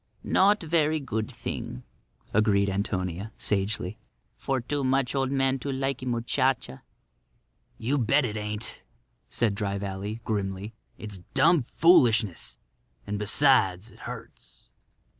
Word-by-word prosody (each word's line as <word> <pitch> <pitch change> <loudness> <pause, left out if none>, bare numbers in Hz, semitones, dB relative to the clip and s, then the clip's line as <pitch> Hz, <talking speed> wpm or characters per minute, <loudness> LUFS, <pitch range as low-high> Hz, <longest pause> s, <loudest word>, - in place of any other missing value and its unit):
"Not 205 +1 +3
verree 155 -1 +2
good 110 -6 -3
thing," 60 - -6 0.5
agreed 100 -2 +3
Antonia, 95 0 -2
sagely, 100 0 -1 0.4
"for 135 -1 -1
too 140 +4 -2
much 130 -1 +1
old 135 -1 0
man 135 -1 +1
to 140 +3 -3
likee 135 -1 -2
muchacha." 120 - 0 1.0
"You 135 +6 0
bet 130 +4 +3
it 110 -3 -3
ain't," 105 0 -3 0.5
said 115 -4 +1
Dry 100 -1 -2
Valley, 100 +2 -4
grimly. 100 0 -3 0.2
"It's 105 -3 -7 0.2
dum 145 +4 +5
foolishness; 120 - +3 0.5
and, 105 0 -3
besides, 105 -3 +3
it - - -18
hurts." - - -10
115 Hz, 120 wpm, -27 LUFS, 100-135 Hz, 1.0 s, dum